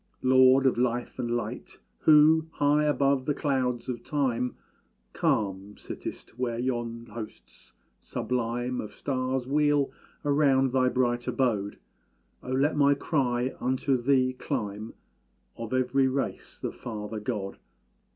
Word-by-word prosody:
Lord 130 +1 +6
of 130 -2 +3
life 120 -1 -1
and 120 - -2
light, 120 0 -4 0.2
Who, 155 +1 +6
high 145 +1 +2
above 140 -2 +2
the 145 - 0
clouds 130 -5 -1
of 120 -2 -4
Time, 125 -4 -1 0.6
Calm 100 -1 -1
sittest, 120 - -8
where 120 -2 -1
yon 120 -2 -3
hosts 105 - -10 0.3
sublime 120 0 -2
Of 105 - -8
stars 130 -2 -2
wheel 145 0 +2 0.3
round 140 -3 +3
thy 130 -1 +3
bright 120 -1 0
abode, 115 -5 0 0.6
Oh, - - -9
let 140 +4 +2
my 140 -1 +4
cry 130 -4 0
unto 130 +1 +1
thee 130 0 +2
climb, 105 -3 -4 0.6
Of 115 -1 -7
every 130 +1 +2
race 135 +1 -3
the - - -3
Father 110 -1 -6
God! 105 -3 -4
130 Hz, 125 wpm, -27 LUFS, 120-135 Hz, 0.6 s, Lord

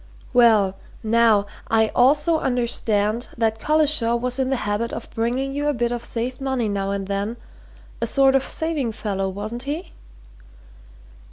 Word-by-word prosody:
"Well, 220 -6 +4 0.3
now, 220 -2 +4 0.2
I 220 -1 +3
also 295 +6 +3
understand 235 -3 0
that 225 -1 0
Collishaw 300 -5 +2
was 250 +2 -2
in 260 -1 +1
the 270 - +1
habit 210 +3 -1
of 230 - -6
bringing 250 +4 -1
you 290 +1 -1
a 295 - +1
bit 240 0 0
of 240 -1 -3
saved 250 +3 -4
money 265 -4 -1
now 200 -1 -2
and 200 -1 -2
then 200 +4 -3 0.6
a - - 0
sort 270 -1 +4
of 270 -1 +3
saving 300 -9 -2
fellow, 195 -3 -2
wasn't 210 +5 -5
he?" 295 +7 -5
235 Hz, 155 wpm, -22 LUFS, 215-270 Hz, 0.6 s, Well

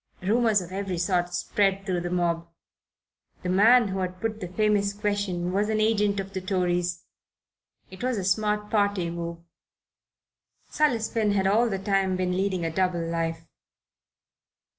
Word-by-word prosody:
Rumours 220 0 +3
of 180 0 -9
every 190 -1 -3
sort 175 0 0
spread 195 +2 0
through 180 -3 -1
the 175 - -3
mob. 170 -1 0 1.0
The 180 - -2
man 220 +4 +5
who 190 0 -3
had 185 0 -3
put 220 0 -3
the 180 - -5
famous 200 +1 +1
question 200 -4 -2
was 205 +2 +1
an 215 0 +1
agent 210 -2 +2
of 195 0 -6
the 190 - -3
Tories. 180 -2 -1 0.9
It 190 - -11
was 255 -2 0
a 195 - -2
smart 210 +2 0
party 200 -5 +1
move. 170 0 -5 1.3
Silas 245 -8 +1
Finn 215 -3 0
had 195 -1 +1
all 225 +5 +3
the 195 - -1
time 195 -1 +1
been 180 0 -1
leading 190 -2 -1
a 165 - -1
double 180 -2 0
life. 165 0 -2
190 Hz, 160 wpm, -26 LUFS, 180-210 Hz, 1.3 s, man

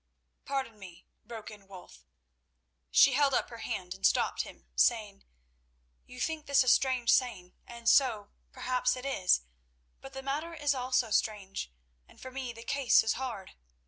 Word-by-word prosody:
"Pardon 265 -6 -3
me—" 180 -3 -13 0.2
broke 225 -1 -9
in 205 -2 -14
Wulf. 180 - -14 0.8
She 255 - +6
held 275 -1 +3
up - - -1
her 230 - -9
hand 180 -4 -4
and 190 - -16
stopped - - +2
him, - - -11
saying: 65 +1 +1 0.8
"You 250 - -11
think 315 +3 -3
this 280 -1 +4
a - - -8
strange 250 -1 +3
saying, 210 -9 0
and 235 -1 -9
so, 230 -8 +3 0.2
perhaps, 255 -1 0
it 255 +1 -8
is; 190 - +2 0.6
but 270 - -12
the 270 0 -7
matter 305 +5 -3
is 290 -2 +1
also 250 -3 0
strange, 200 - -1 0.4
and - - -20
for 260 - -9
me 260 -2 -5
the 230 0 -11
case 275 0 +3
is 220 - +1
hard. 240 -8 -6
245 Hz, 165 wpm, -30 LUFS, 205-270 Hz, 0.8 s, She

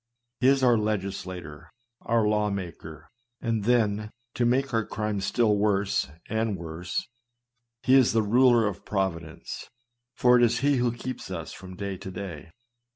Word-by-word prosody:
He 130 - +3
is 135 0 +4
our 120 -3 +5
legislator, 95 -6 -4 0.3
our 115 -2 +2
law 105 0 +2
maker; 85 -5 -7 0.3
and 115 -4 -1
then, 110 -3 +2 0.2
to 120 - +1
make 135 +2 +1
our 115 -1 +2
crime 105 -2 -3
still 110 +1 +2
worse 100 -4 +1 0.2
and 110 -2 -1
worse, 85 +4 -4 0.8
he 130 - +3
is 130 -3 +6
the 110 -1 +2
ruler 120 +1 +5
of 105 -3 -3
providence; 85 -5 -4 0.5
for 125 0 +5
it 120 - +4
is 120 0 +2
he 140 0 +3
who 120 -1 +2
keeps 125 +2 -6
us - - -5
from 95 -1 -10
day 100 0 -4
to 95 - -8
day. 90 -4 -7
105 Hz, 160 wpm, -27 LUFS, 95-120 Hz, 0.8 s, is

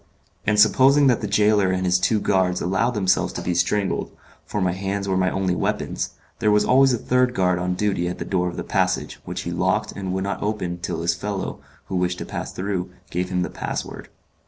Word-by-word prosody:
And 105 -1 +3
supposing 135 +7 +6
that 125 -3 +3
the 105 - -2
gaoler 105 -1 +3
and 95 0 -1
his 90 0 +3
two 105 +4 +2
guards 95 -2 +1
allowed 105 +7 0
themselves 95 -2 +2
to - - -4
be 90 - 0
strangled 100 +3 0 0.4
for 105 - -2
my 90 -2 +1
hands 100 +2 -3
were 95 - +1
my 95 0 +2
only 95 -1 0
weapons - - -2 0.2
there 110 -2 +2
was 105 0 +4
always 135 +1 +5
a 120 - +1
third 125 +2 +1
guard 90 -1 +2
on 90 0 -1
duty 95 -3 0
at 90 - -4
the - - -5
door 90 -2 0
of 85 - -5
the - - -3
passage, - - -1
which - - -4
he - - -4
locked - - 0
and 95 -2 -5
would 95 0 -1
not 100 - -3
open 95 -5 -2
till 85 -1 -3
his 85 0 +2
fellow 95 +2 -4 0.3
who 95 - -5
wished 90 0 0
to - - -5
pass - - -5
through 95 -1 -3 0.2
gave 90 +1 -2
him 90 -1 0
the - - -4
password. - - -5
95 Hz, 225 wpm, -23 LUFS, 90-105 Hz, 0.4 s, supposing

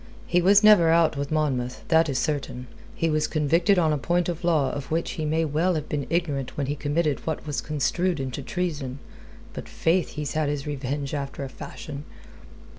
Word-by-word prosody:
He 180 - +2
was 200 +4 +5
never 205 -6 +7
out 165 -1 +4
with 140 +1 -3
Monmouth; 130 -5 -1
that 160 -1 +4
is 135 - -1
certain. 130 -2 -2 0.3
He 165 - 0
was 155 -1 +1
convicted 165 +5 +2
on 160 -3 +3
a 150 - -1
point 175 +4 0
of 170 0 -4
law 155 -6 +2
of 145 -2 -6
which 165 +1 -1
he 155 - -3
may 160 +2 +1
well 165 +5 +1
have 155 -1 -3
been 145 -2 -3
ignorant 150 -6 -1
when 140 - 0
he 145 +2 -2
committed 150 +1 0
what 160 -1 -2
was 145 -5 -2
construed 160 +3 0
into 135 +1 -4
treason. 145 -5 -3 0.6
But, - - -7
faith, 170 +1 +1
he's 150 -2 -4
had 155 -2 0
his 145 -2 -3
revenge, 140 0 -3
after 140 -1 -4
a 135 - -5
fashion." 140 +2 -8
150 Hz, 195 wpm, -25 LUFS, 140-165 Hz, 0.6 s, never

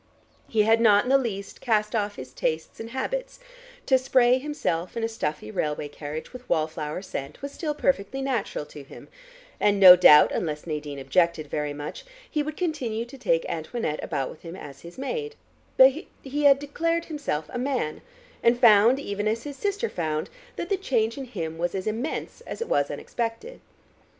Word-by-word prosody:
He 215 -2 +2
had 225 +2 +4
not 205 -3 +6
in 250 - -1
the 275 - +7
least 200 -6 -5
cast 215 -2 +1
off 205 -1 -1
his 130 0 -9
tastes 160 +3 -3
and 225 - -6
habits; - - -4 0.5
to 260 -1 +4
spray 255 -1 +4
himself 220 - -3
and 230 -1 -1
a - - 0
stuffy 150 - -4
railway 150 +2 -2
carriage 150 - -7
with 250 0 -11
wall 155 - +2
flower 155 +2 -5
scent 140 -5 -6
was 280 - -4
still 300 0 -3
perfectly 270 -4 0
natural 250 - -2
to 145 - -11
him, 135 - -13 0.5
and 205 -1 +3
no 185 -2 +11
doubt, 150 -4 +7
unless 150 -3 -3
Nadine 150 -3 -4
objected 155 +3 +1
very 150 -1 -1
much, 145 +1 -7 0.2
he 300 - -1
would 305 +1 -5
continue 255 -10 -2
to 245 - -12
take - - +1
Antoinette 225 -11 -3
about 135 -4 -2
with - - -14
him 170 0 -8
as 140 -7 -10
his 170 +1 -12
maid, 440 - -4 0.4
but 260 +1 +9 0.3
he 285 +2 -3
had 275 -1 +7
declared 330 +4 -1
himself 285 - -3
a 245 - -2
man, 255 - -2 0.4
and 235 +1 +3
found, 230 +2 +6
even 205 -5 -3
as 225 +2 -1
his 290 -1 -6
sister 405 - -1
found, 155 - -3 0.2
that 345 - -5
the 395 - +1
change 230 - 0
in 275 - -6
him 165 -9 -5
was 175 +2 -1
as 190 - -3
immense 235 - -3
as - - -6
it 465 - -3
was - - +1
unexpected. 240 - -5
225 Hz, 190 wpm, -26 LUFS, -, 0.5 s, no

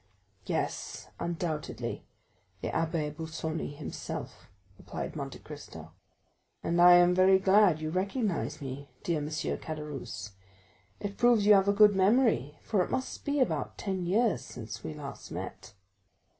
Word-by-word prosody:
"Yes, - - -3
undoubtedly, 170 -2 -3 0.5
the - - -2
Abbé 160 -2 -1
Busoni 160 -1 -4
himself," 150 - -6 0.3
replied - - -6
Monte - - -5
Cristo. - - -10 0.7
"And 170 +1 +2
I 175 0 +10
am 175 0 +6
very 185 +1 +6
glad 190 -3 +5
you 155 0 -3
recognize 185 - -1
me, 140 +1 -6
dear 170 -3 0
M. 145 - -3
Caderousse; 150 -8 -4 0.7
it 200 -1 -5
proves 240 -4 +5
you 210 - +8
have 195 -1 +5
a - - +5
good 210 0 +6
memory, 195 - +3
for 200 -5 +2
it - - -6
must 260 - -3
be 285 0 0
about 255 - 0
ten 190 -4 -2
years 210 +1 +2
since 115 -3 -8
we 155 - -5
last 140 -2 -8
met." 110 - -7
175 Hz, 140 wpm, -30 LUFS, 150-200 Hz, 0.7 s, I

